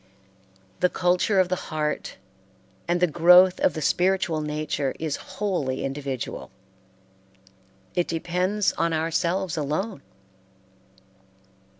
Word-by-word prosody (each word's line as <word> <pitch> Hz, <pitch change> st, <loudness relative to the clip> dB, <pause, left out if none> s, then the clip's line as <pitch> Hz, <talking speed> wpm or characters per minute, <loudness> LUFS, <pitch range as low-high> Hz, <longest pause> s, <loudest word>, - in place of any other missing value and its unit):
The 180 Hz, -, +3 dB
culture 180 Hz, +3 st, +1 dB
of 185 Hz, -, +4 dB
the 185 Hz, -, +1 dB
heart 150 Hz, -1 st, -3 dB, 0.7 s
and 175 Hz, +1 st, +1 dB
the 180 Hz, -, +5 dB
growth 180 Hz, +3 st, +6 dB
of -, -, +2 dB
the 155 Hz, -, -3 dB
spiritual 180 Hz, -1 st, +1 dB
nature 150 Hz, -2 st, -2 dB
is 155 Hz, -3 st, -3 dB, 0.2 s
wholly 175 Hz, -11 st, -1 dB
individual; 135 Hz, -2 st, -5 dB, 1.4 s
it 175 Hz, -, 0 dB
depends 180 Hz, +5 st, 0 dB
on 165 Hz, 0 st, +1 dB
ourselves 170 Hz, +3 st, -1 dB
alone. 155 Hz, +5 st, -2 dB
170 Hz, 100 wpm, -25 LUFS, 150-185 Hz, 1.4 s, growth